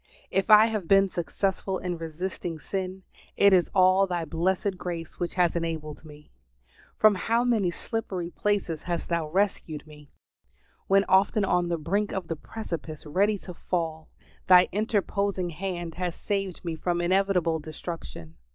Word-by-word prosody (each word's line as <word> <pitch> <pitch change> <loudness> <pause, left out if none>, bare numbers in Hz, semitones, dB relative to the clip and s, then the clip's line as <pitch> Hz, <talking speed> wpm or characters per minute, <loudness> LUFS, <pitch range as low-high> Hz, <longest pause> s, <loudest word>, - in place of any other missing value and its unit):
If 195 +2 0
I 215 0 +9
have 215 -6 -2
been 195 +1 +5
successful 190 +2 -2
in 180 -1 -3
resisting 165 +1 -5
sin, 190 +3 -4 0.3
it 200 -1 +6
is 180 -2 +4
all 185 +1 +5
Thy 175 -2 -2
blessed 185 +5 0
grace 170 -3 -6
which 175 - -3
has 175 -2 +2
enabled 160 -3 -4
me. 150 -1 -14 0.7
From 215 -1 +6
how 230 +5 +1
many 225 -7 +2
slippery 180 -2 -4
places 195 -7 -1
has 175 -2 -3
Thou 170 -3 -1
rescued 175 -4 -1
me! 150 -2 -15 0.8
When 195 0 +5
often 200 +2 +3
on 175 -2 +1
the 170 - 0
brink 195 +7 -1
of 185 -4 -4
the 165 - -1
precipice, 160 -5 -7
ready 200 +7 +2
to 185 -1 -9
fall, 165 -3 -3 0.4
Thy 180 -1 +7
interposing 200 -3 -1
hand 175 -1 -4
has 180 0 -3
saved 195 -3 -3
me 165 -1 -2
from 175 +2 -1
inevitable 180 -2 +2
destruction. 155 - -8
180 Hz, 150 wpm, -27 LUFS, 165-195 Hz, 0.8 s, I